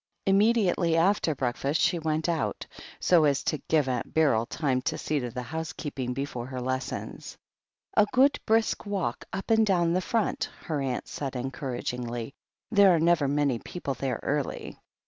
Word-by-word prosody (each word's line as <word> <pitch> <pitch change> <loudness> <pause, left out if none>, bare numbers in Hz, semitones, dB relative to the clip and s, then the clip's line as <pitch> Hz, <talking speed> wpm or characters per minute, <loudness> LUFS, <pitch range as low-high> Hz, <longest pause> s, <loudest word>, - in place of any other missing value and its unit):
Immediately 195 -4 +3
after 170 -2 +2
breakfast 135 +4 -1
she 175 - +2
went 160 0 -1
out, 165 -3 -1 0.3
so 175 -3 +4
as 140 -2 +2
to 155 - -1
give 155 -4 +3
Aunt 125 -2 -3
Beryl 130 -8 +3
time 135 -5 0
to - - -2
see 150 -1 -1
to 125 -2 -3
the 125 +1 -5
housekeeping 145 -4 -4
before 130 -3 -4
her 130 -1 -5
lessons. 130 +1 -4 0.6
"A 210 - +5
good 275 +3 +4
brisk 225 -1 +1
walk 190 -12 -2
up 195 +4 -4
and 225 0 +5
down 175 -5 +2
the 185 - +1
Front," 225 +2 -1
her 150 -3 -2
aunt 130 -2 -2
said 135 -2 -5
encouragingly. 125 -2 -4 0.4
"There 200 -4 +6
are - - +2
never 165 -3 +3
many 140 -3 +1
people 140 -2 -5
there 130 -1 -3
early." 145 -1 -2
150 Hz, 165 wpm, -27 LUFS, 130-180 Hz, 0.6 s, There